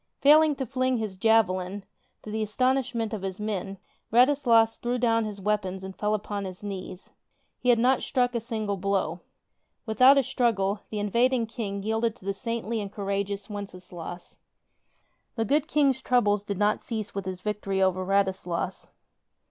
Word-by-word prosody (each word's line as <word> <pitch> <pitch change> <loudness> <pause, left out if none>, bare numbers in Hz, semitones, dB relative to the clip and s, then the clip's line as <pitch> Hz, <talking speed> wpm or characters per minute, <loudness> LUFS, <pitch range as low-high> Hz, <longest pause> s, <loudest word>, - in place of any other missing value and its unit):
Fail 300 +2 +7
ing 310 -2 +2
to 270 - -3
fling 255 +1 0
his 215 -4 -4
javelin, 195 -2 +1 0.4
tO' 215 - -7
the 220 +1 -2
astonishment 240 0 0
of 210 - -3
his 190 0 -5
men, 200 -2 -3 0.3
Rad 250 +5 +6
islas 230 -5 +3
threw 240 +1 -1
down 230 -2 +2
his 210 -2 -6
weapons 190 -2 -1
and 190 0 -7
fell 210 0 0
upon 205 -1 -4
his 185 +1 -8
knees. 190 -2 -7 0.5
He 250 - 0
had 240 - +6
not 250 +2 +3
struck 250 -2 0
a 235 - 0
single 215 -3 -3
blow. 190 -3 -1 0.7
Without 255 +5 +6
a 275 - +4
struggle, 225 -6 0
the 215 - -5
in 205 -1 -2
vading 245 0 +2
King 200 -4 -4
yielded 220 +1 0
to - - -18
the 200 - 0
saintly 230 +1 -3
and 200 -1 -6
courageous 200 0 -3
Wences 200 -3 -8
laus. 175 0 -8 1.0
The 225 -1 0
good 290 +6 +1
King's 280 -5 +2
troubles 210 -6 +2
did 200 -2 -3
not 210 +1 +1
cease 215 -3 -4
with 195 -1 -4
his 185 -1 -5
victory 210 -2 -2
over 185 -1 +2
Radislas. 190 -2 -1
210 Hz, 175 wpm, -27 LUFS, 195-240 Hz, 1.0 s, Fail